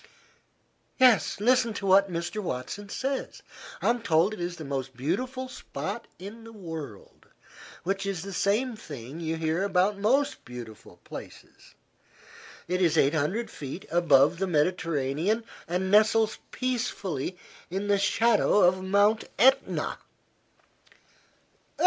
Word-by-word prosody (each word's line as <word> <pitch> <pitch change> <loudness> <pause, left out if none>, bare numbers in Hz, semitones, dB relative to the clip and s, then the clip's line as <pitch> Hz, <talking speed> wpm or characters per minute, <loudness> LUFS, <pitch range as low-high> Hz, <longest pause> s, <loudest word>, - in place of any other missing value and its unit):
"Yes. 240 - +4
Listen 235 0 +3
to 200 - -4
what 195 0 +5
Mr. 175 +5 -3
Watson 185 +6 -5
says: 270 +5 -3 0.4
'I'm 240 0 +2
told 170 +1 +2
it 215 - -8
is 175 0 -3
the 160 - -8
most 135 -2 -4
beautiful 255 - -2
spot 205 - -6
in 210 +5 -9
the 225 - -11
world, 160 - -9 0.6
which 195 +2 -2
is 190 -4 -3
the 195 0 -7
same 220 +7 +1
thing 145 - -9
you 165 -1 -2
hear 160 +2 -1
about 200 +1 +1
most 265 +8 +1
beautiful 120 -3 -10
places. - - -12 0.9
It 180 +2 0
is 170 -4 +3
eight 140 +3 +4
hundred 175 +10 -1
feet 140 +6 -7
above 165 -1 +4
the 195 - 0
Mediterranean 165 - 0 0.2
and 185 +2 -1
nestles 220 +1 +4
peacefully 200 - -3 0.3
in 195 +3 -3
the 200 -1 +3
shadow 215 0 +3
of 185 +1 +4
Mount 205 +3 +3
Etna.'" 265 +3 +3
190 Hz, 125 wpm, -27 LUFS, 160-220 Hz, 0.9 s, what